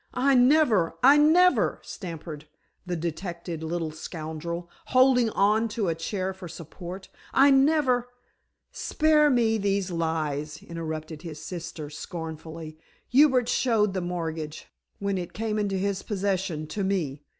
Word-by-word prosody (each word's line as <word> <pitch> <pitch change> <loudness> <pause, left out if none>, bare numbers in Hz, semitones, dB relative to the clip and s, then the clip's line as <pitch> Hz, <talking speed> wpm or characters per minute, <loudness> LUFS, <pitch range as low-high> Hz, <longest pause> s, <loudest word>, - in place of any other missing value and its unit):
"I 275 +2 +3
never 250 - +4
I 275 +3 +8
never!" 345 +5 +4
stammered 160 -4 -8 0.4
the 180 - -1
detected 170 0 -5
little 160 0 -3
scoundrel, 160 +2 -6 0.2
holding 255 -2 +4
on 215 +2 +2
to 205 -6 +1
a - - +1
chair 185 +3 -3
for 190 -1 -9
support. 175 +4 -9 0.3
"I 275 +1 +7
never 270 -3 +3 0.3
" - - -53 0.2
"Spare 305 -1 +4
me 230 -4 +2
these 195 -2 0
lies," 155 -3 -2
interrupted 160 -2 -6
his 160 -3 -8
sister 160 -3 -7
scornfully, 160 0 -7 0.3
"Hubert 260 -2 +5
showed 215 -6 +2
the 185 - -1
mortgage, 160 -3 -4 0.3
when 200 -1 -1
it 175 - -6
came 215 -1 -2
into 200 -2 0
his 195 0 -1
possession, 190 -5 -2
to 195 +6 -4
me. 165 -8 -1
185 Hz, 135 wpm, -26 LUFS, 160-225 Hz, 0.4 s, I